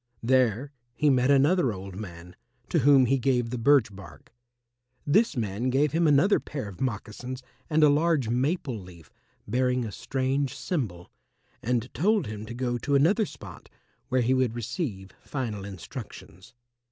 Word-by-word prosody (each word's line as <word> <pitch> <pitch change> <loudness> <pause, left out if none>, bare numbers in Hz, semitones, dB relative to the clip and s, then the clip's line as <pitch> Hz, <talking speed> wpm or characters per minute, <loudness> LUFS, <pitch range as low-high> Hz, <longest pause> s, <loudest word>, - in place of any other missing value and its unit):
There 130 +1 +2 0.2
he 150 +1 +3
met 125 0 +2
another 140 0 +4
old 95 -1 -8
man, 90 -3 -9 0.3
to - - +2
whom 135 -1 +6
he 135 +2 +2
gave 125 -2 +1
the 125 - -2
birch 120 -5 +3
bark. 100 +3 -13 0.7
This 175 - +3
man 110 +2 -1
gave 140 +3 +2
him 165 +1 +2
another 150 +8 +4
pair 135 -8 -6
of 100 -3 -10
moccasins 125 +1 -4 0.3
and 155 -1 +3
a - - +8
large 150 -3 +2
maple 130 - -1
leaf 90 -5 -14 0.4
bearing 125 +2 +1
a 110 - -5
strange 135 +3 -2
symbol, 105 - -4 0.5
and 120 +1 -1
told 205 +1 +2
him 105 0 -7
to 120 - -7
go 120 -1 -2
to 140 +4 0
another 185 - +3
spot, - - -12 0.4
where 130 0 +2
he 125 +2 +2
would 130 -3 +1
receive 115 - -4
final 110 -8 -4
instructions. 95 -1 -10
125 Hz, 155 wpm, -27 LUFS, 110-145 Hz, 0.7 s, a